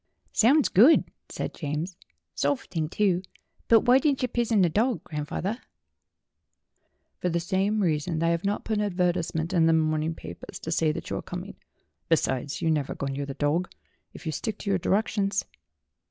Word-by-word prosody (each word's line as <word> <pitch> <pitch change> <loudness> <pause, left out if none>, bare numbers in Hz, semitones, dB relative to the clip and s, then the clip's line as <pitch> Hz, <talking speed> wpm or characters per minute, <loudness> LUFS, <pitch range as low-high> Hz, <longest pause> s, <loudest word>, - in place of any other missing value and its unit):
"Sounds 275 +6 +5
good," 245 - +6 0.3
said - - -4
James. 155 +4 -4 0.4
"Soft 145 -1 -1
thing, 160 -4 -1
too. 185 -2 +1 0.5
But 225 -1 +6
why 250 +2 +5
didn't 280 -3 +1
yer 250 - +1
pizun 230 -4 +2
the - - +5
dog, 225 +9 0
grandf 150 -2 -5
awther 210 +7 -2 0.8
?" - - -49
"For 180 - +1
the 170 0 0
same 195 +4 0
reason 160 -2 0
that 165 - 0
I - - +3
have 170 +1 0
not 200 +1 -1
put 220 -2 0
an - - +1
adver 180 -3 +1
tisement 165 -1 -3
in 165 -3 +4
the 165 - +4
morning 155 0 +1
papers 85 - -9
to 160 - -5
say 160 -1 +2
that - - -6
you - - -1
are - - -4
coming. - - -7 0.5
Besides, 130 +2 0
you 165 - +3
never 150 -3 -1
go - - -4
near 140 +1 -3
the 135 - -6
dog, 155 +5 0 0.4
if - - -12
you 160 - -1
stick 215 +9 -3
to 200 - -3
your 190 - +2
directions." 200 +1 0
175 Hz, 195 wpm, -27 LUFS, 155-210 Hz, 0.8 s, good